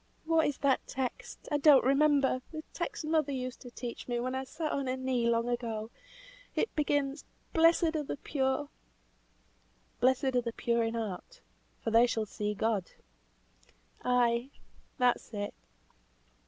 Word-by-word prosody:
What 325 0 +3
is 290 - -2
that 275 -2 +1
text, 260 -2 -5
I 295 - +2
don't 285 -2 +7
remember, 275 -1 +3
that 310 0 -8
text 340 -2 -4
mother 310 -2 +1
used 255 -1 -4
to 245 - -9
teach 240 -1 -7
me 240 -1 -1
when 255 +2 -2
I 265 0 -2
sat 310 +3 -3
on 275 -1 -1
her 255 +1 -1
knee 255 -2 0
long 230 0 +1
ago; 230 -2 -3 0.6
it - - 0
begins, 290 -1 0 0.3
'Blessed 330 0 +4
are 310 - +1
the 285 - -4
pure'" 270 0 -1 1.3
"Blessed 260 +2 +3
are 250 - +3
the 235 -1 -4
pure 235 0 +1
in 225 0 -1
heart, 225 - -5 0.4
for 225 - -1
they 230 +2 +6
shall 225 -2 -1
see 210 0 -3
God." 210 -3 0 1.1
"Ay, 245 0 +2 0.5
that's 245 -3 +1
it! 205 0 -3
255 Hz, 155 wpm, -31 LUFS, 235-290 Hz, 1.3 s, don't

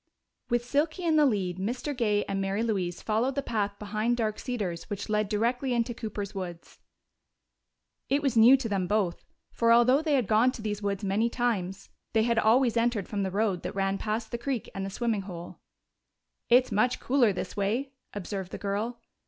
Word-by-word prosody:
_ - - -44
With 240 0 +1
Silky 305 +7 0
in 325 -2 +2
the 300 -2 +6
lead, 185 -6 -1
Mr. 250 +8 -3
Gay 210 -4 +1
and 195 0 -2
Mary 195 +3 -1
Louise 185 -6 -2
followed 230 +5 0
the 280 - -1
path 205 -4 -2
behind 215 +3 -1
Dark 215 -2 -1
Cedars 200 -10 -4
which 205 0 -5
led 210 -1 +1
directly 245 +4 0
into 235 +1 0
Cooper's 210 -3 -5
woods. 175 -4 -7 1.3
It 285 +2 +2
was 270 -4 +1
new 235 +4 +8
to 255 -3 -3
them 195 -4 -1
both, 195 -3 0 0.3
for 230 0 +2
although 245 +4 +5
they 310 -2 +1
had 255 -4 +2
gone 220 +5 +4
to - - -8
these 210 -1 -3
woods 200 0 -2
many 205 +4 +1
times, 205 -6 -2 0.2
they 220 -1 +4
had 235 0 +2
always 235 +2 +3
entered 230 -4 +1
from 205 -2 -2
the 190 - 0
road 195 -2 0
that - - -5
ran 195 0 0
past 220 +1 -3
the 235 - -3
creek 255 -2 -3
and 195 - -4
the 195 - -3
swimming 225 0 -1
hole. 175 -3 -9 0.9
"It's 250 +1 +5
much 215 +5 +2
cooler 250 -4 +3
this 185 -1 -5
way," 225 +7 -1 0.2
observed 195 -2 -5
the - - -5
girl. 210 +4 -2
220 Hz, 195 wpm, -28 LUFS, 200-240 Hz, 1.3 s, new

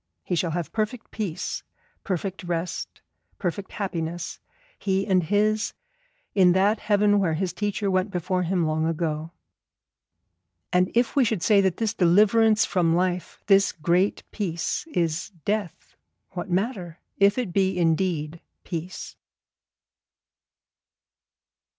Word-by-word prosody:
He - - -3
shall 170 0 +1
have 165 -2 -3
perfect 220 +2 -3
Peace, 190 -6 -3 0.4
perfect 190 0 -3
rest, 175 0 -4 0.4
perfect 190 +2 -4
happiness, 175 -3 -4 0.4
he 195 0 0
and 190 -3 +3
his, 210 +5 +1 0.6
in 185 -3 +5
that 200 +4 +3
heaven 205 -1 +3
where 170 -5 +1
his 180 +1 -2
teacher 205 +1 -1
went 185 +2 +1
before 180 0 -1
him 180 -1 +1
long 155 +1 0
ago. 160 -1 -2 1.4
And 180 +1 +3
if 240 0 +2
we 275 - +5
should 215 -7 0
say 210 -3 +5
that 190 -3 +1
this 225 -2 0
Deliverance 215 +5 +4
from 170 -3 +2
life, 180 0 -1
this 195 -1 +5
Great 175 +5 +1
Peace, 180 - -2
is 170 - -1 0.2
Death, 205 -5 -3 0.4
what 180 +1 -5
matter, 185 -3 -2 0.2
if 200 +2 +5
it 235 -9 -2
be 190 -1 +2
indeed 165 -2 0 0.2
Peace? 175 +1 -6
185 Hz, 125 wpm, -25 LUFS, 170-205 Hz, 1.4 s, in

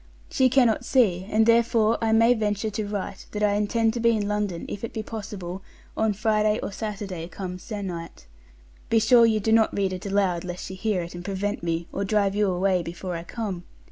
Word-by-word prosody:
She 260 -1 +3
cannot 245 -4 +3
see, 190 -8 +2
and 220 0 +3
therefore 230 -1 +3
I 225 - +2
may 230 +2 +5
venture 215 -1 -1
to 210 0 -3
write 200 -2 -5
that 210 0 -2
I 205 -1 +3
intend 220 +2 +1
to 240 - -3
be 235 0 +4
in 205 -1 -2
London 205 -4 -2
if 205 - -6
it 230 - -5
be 220 - -3
possible 200 -5 -6 0.3
on 220 -1 +1
Friday 215 0 +1
or - - -3
Saturday 195 -5 -5
come 180 +1 -6
sennight. 180 - -6 0.6
Be 225 - +3
sure 230 +1 +6
you 220 -1 +2
do 220 +2 0
not 220 -2 +3
read 195 -2 0
it 185 +2 -6
aloud, 195 -4 +1
lest 180 -1 -6
she 190 - -7
hear 190 -1 -1
it, 170 - -8
and 175 0 -7
prevent 200 +2 -2
me, 165 0 -2
or - - -1
drive 200 -1 +1
you 205 -1 +2
away 185 0 +1
before 175 +2 -5
I 165 - -4
come. 195 -3 -5
205 Hz, 210 wpm, -25 LUFS, 185-220 Hz, 0.6 s, sure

